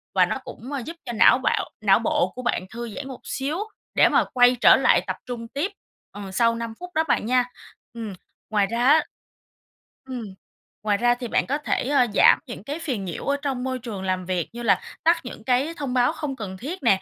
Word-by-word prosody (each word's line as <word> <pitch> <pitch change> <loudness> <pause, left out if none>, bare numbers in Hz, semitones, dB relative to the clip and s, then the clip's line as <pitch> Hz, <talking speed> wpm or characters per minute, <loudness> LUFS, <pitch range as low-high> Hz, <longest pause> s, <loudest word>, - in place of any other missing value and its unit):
và - - +6
nó - - -2
cũng, 255 - -9
ờ, 280 - -2
giúp 335 - -7
cho 240 - -4
não 220 - +6
bạo - - 0
não - - +5
bộ - - +1
của 255 - -5
bạn 240 -6 -1
thư 235 0 -5
giãn 280 - -6
một 260 -2 -8
xíu 280 +4 -3 0.4
để - - +6
mà - - +4
quay 245 0 +6
trở - - +8
lại - - +4
tập - - -1
trung 235 -2 -6
tiếp, 290 - -2 0.4
ờ, 200 -2 -8
sau 230 +3 +2
5 230 -1 -5
phút 360 - -7
đó 320 - +3
bạn - - +1
nha. 250 +2 +3 0.5
Ừm. 225 -3 -6 0.4
Ngoài 205 -2 +2
ra 235 +3 -1
á 310 +2 +7 1.1
ừm, 250 -3 -4 0.6
ngoài 210 -1 +2
ra 240 +2 +3
thì 245 0 -6
bạn - - +1
có 280 - 0
thể, 295 -3 -1
ờ, 275 -4 +4
giảm - - +6
những 235 - -8
cái 290 +8 -5
phiền 250 -12 -3
nhiễu 175 - -5
ở 280 0 +1
trong 265 -4 -2
môi 260 -1 -2
trường 210 -5 -6
làm 185 -1 -1
việc 180 -3 -2
như 240 - -6
là 225 - +3 0.2
tắt 335 +2 +5
những 245 -3 -9
cái 260 +7 +1
thông 275 -4 -3
báo 245 -1 +3
không 280 -3 -4
cần 195 -5 -6
thiết 295 - -6
nè, 195 -6 +4
245 Hz, 230 wpm, -24 LUFS, 220-275 Hz, 1.1 s, trở